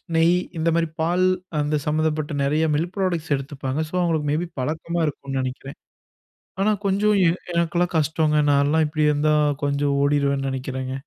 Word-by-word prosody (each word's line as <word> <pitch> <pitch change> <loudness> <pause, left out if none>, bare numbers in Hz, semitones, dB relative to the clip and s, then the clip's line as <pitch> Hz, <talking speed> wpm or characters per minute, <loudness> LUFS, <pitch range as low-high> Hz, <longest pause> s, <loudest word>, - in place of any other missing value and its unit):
நெய் 165 +2 +4 0.2
இந்த 165 +1 +1
மாரி 165 -1 +1
பால் 175 +3 +2 0.3
அந்த 150 0 0
சம்மந்தப்பட்ட 155 -1 -1
நெறைய 150 +3 +1
மில்க் 170 +4 -2
பிராடக்ட்ஸ் 175 -6 -1
எடுத்துப்பாங்க. 135 0 -4
சோ - - -21
அவுங்களுக்கு 160 -4 0
மேபி 165 +3 -1
பழக்கமா 160 +4 -2
இருக்கும்னு 140 -2 -4
நினைக்கிறேன். 130 +1 -6 0.8
ஆனா 215 +2 +3
கொஞ்சம் 205 +2 +2
எ - - +5 0.3
எனக்கெல்லாம் 170 +1 0
கஷ்டோங்க. 155 0 +1
நான்லாம் 145 +3 +3
இப்படி 155 0 -1
இருந்தா 150 +1 +2 0.3
கொஞ்சம் 140 0 +1
ஓடிருவேன்னு 140 -1 +1
நினைக்கிறேங்க. 130 0 -4
155 Hz, 145 wpm, -23 LUFS, 140-165 Hz, 0.8 s, எ